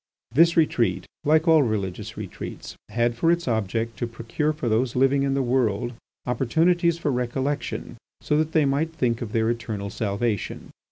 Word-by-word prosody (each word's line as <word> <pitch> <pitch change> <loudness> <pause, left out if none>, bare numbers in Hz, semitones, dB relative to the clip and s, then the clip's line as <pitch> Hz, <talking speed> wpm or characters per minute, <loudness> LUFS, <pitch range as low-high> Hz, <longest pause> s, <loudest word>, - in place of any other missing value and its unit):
This 165 +7 +4
retreat, 150 -7 +2 0.2
like 155 +3 +3
all 160 -2 +6
religious 105 -7 -2
retreats, - - -7
had 120 0 +1
for 165 +8 +3
its 170 -2 0
object 115 0 -1
to 120 - -1
procure 115 +6 -2
for 150 -5 -4
those 115 +2 +1
living 135 +2 +3
in 135 0 +1
the 135 - +1
world 120 -2 0 0.3
opportunities 165 +7 +2
for 150 -4 -1
recollection 130 +3 -2 0.2
so 150 - 0
that 155 0 +1
they 155 -3 +3
might 145 +4 0
think 120 -5 0
of 115 -3 -4
their 110 0 +1
eternal 110 -4 -4
salvation. 105 0 -2
125 Hz, 165 wpm, -24 LUFS, 115-150 Hz, 0.3 s, all